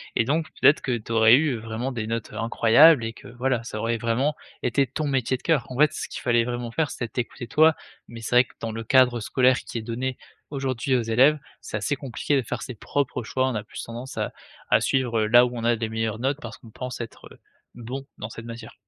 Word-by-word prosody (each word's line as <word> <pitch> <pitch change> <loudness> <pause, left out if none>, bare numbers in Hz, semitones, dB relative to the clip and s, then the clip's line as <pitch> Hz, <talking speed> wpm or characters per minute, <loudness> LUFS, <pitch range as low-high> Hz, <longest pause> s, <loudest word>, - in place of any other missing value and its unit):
Et - - +3
donc 155 +5 0 0.2
peut-être 150 - +6
que 125 -2 -1
tu 115 0 -10
aurais 110 +1 +7
eu 145 -3 +2
vraiment 115 +4 -4
des 115 -3 -4
notes, 115 0 -4
heu, 105 - -8
incroyables 115 +5 +5
et 115 0 -4
que, - - -13
voilà, 125 0 -1
ça 110 -2 -6
aurait 115 +1 0
vraiment 120 +6 0 0.3
été 135 +3 +2
ton 145 +4 -3
métier 130 -2 0
de - - -23
cœur. 155 -7 +1
En 125 - -6
fait, 150 -1 +5
ce - - -4
qu'il - - -7
fallait 120 -1 +3
vraiment 120 -1 -4
faire 155 +3 -1
c'était 120 - -4
t'écouter 120 +1 -5
toi, 155 +5 +5 0.3
mais 115 -1 -10
c'est 120 - -2
vrai 125 - +8
que - - -21
dans 115 - -4
le 115 0 -5
cadre 125 0 +4
scolaire 130 +3 +3
qui - - -7
est - - -6
donné 125 +3 -3 0.3
aujourd'hui 130 -2 -1
aux 120 - +1
élèves, 130 +7 +4 0.2
c'est - - -4
assez 145 - -1
compliqué 135 +1 -2
de 135 - +3
faire 120 +1 -5
ses 125 - -7
propres 130 +2 -2
choix. 130 +3 0
On 130 - -2
a 105 - -3
plus 105 - -8
tendance 120 +3 -8
à - - -2 0.4
à - - +4
suivre 120 -4 +1
là 120 +3 +6
où 125 - -3
on 115 - -5
a 120 - +3
des 110 0 -2
meilleures 110 0 -2
notes 135 +3 -1
parce 115 -1 -8
qu'on 115 - -16
pense 125 0 -6
être, 115 - -9
heu, - - -16 0.4
bon 125 +3 -6
dans 105 - -6
cette 115 +1 -9
matière. 115 0 -9
120 Hz, 250 wpm, -25 LUFS, 115-130 Hz, 0.4 s, vrai